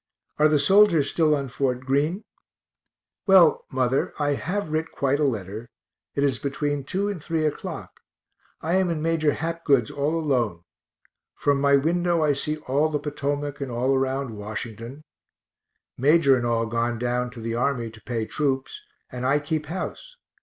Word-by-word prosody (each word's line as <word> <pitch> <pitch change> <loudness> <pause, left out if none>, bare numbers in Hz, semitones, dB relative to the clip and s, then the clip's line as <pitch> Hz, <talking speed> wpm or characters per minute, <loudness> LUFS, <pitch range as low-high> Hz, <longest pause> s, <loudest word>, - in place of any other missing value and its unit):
Are 155 - +6
the 155 -1 +3
soldiers 165 -1 +4
still 155 -2 +3
on 140 -2 -3
Fort 125 -1 -1
Greene? 145 +9 0 1.0
Well, 185 -5 +6
mother, 130 0 0
I 145 -1 +1
have 180 +3 -3
writ 160 +1 -1
quite 140 +1 0
a - - +2
letter 110 -3 -3 0.5
it 140 - +1
is 135 -3 +1
between 145 0 -2
2 195 +7 -1
and 195 -7 -4
3 160 -2 -1
o'clock 150 - -5 0.6
I 170 +4 +1
am 190 -2 +2
in 160 -2 -2
Major 160 -3 +2
Hapgood's 160 -7 0
all 150 +4 -1
alone 120 - 0 0.7
from 140 -1 +1
my 140 0 +5
window 170 +3 +1
I 150 -1 +3
see 150 +2 -2
all 145 +4 +2
the 150 - 0
Potomac, 145 -1 -3
and 135 - -3
all 125 +3 0
around 135 -2 -1
Washington 115 +6 -7 1.0
Major 140 0 +5
and 120 -1 -1
all 115 -1 +1
gone 115 +1 -1
down 125 +1 -1
to 125 -1 -11
the 115 0 -3
army 120 -1 -1
to 110 -1 -14
pay 115 -2 -3
troops, 135 - -2 0.3
and 125 0 -6
I 135 +3 +3
keep 150 +1 -3
house. 345 - -6
140 Hz, 165 wpm, -24 LUFS, 125-155 Hz, 1.0 s, Are